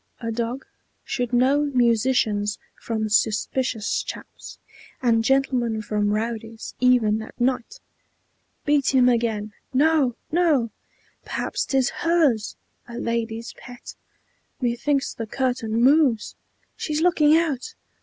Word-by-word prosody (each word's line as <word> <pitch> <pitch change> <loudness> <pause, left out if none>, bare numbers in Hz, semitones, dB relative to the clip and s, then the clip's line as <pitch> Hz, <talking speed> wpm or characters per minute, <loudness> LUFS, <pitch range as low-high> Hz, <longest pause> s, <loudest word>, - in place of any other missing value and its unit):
A 230 -1 -3
dog 235 +3 -3 0.4
Should 245 -2 -3
know 260 +4 +3
musicians 225 -3 +2 0.2
from 220 -2 -2
suspicious 220 +2 0
chaps, - - -9 0.4
And 230 -3 +2
gentlemen 245 -3 +1
from 210 -1 0
rowdies, 225 +1 -4
even 235 -4 +3
at 220 - -11
night!" 255 - -1 0.9
"Beat 285 -2 +2
him 250 -1 +5
again!" 225 -3 0 0.2
"No, 290 -3 +3 0.2
no! 305 -9 +2 0.5
Perhaps - - -3
't 270 - +1
is 265 0 +2
HERS! 310 -11 +2 0.3
A 235 -1 -8
lady's 230 -1 -3
pet! 245 -1 -11 0.7
Methinks 270 +3 0
the 225 - -6
curtain 245 -2 -2
moves! 260 -3 +3 0.4
She's 305 0 -2
looking 315 -3 +5
out! 305 -7 -2
245 Hz, 115 wpm, -23 LUFS, 225-270 Hz, 0.9 s, him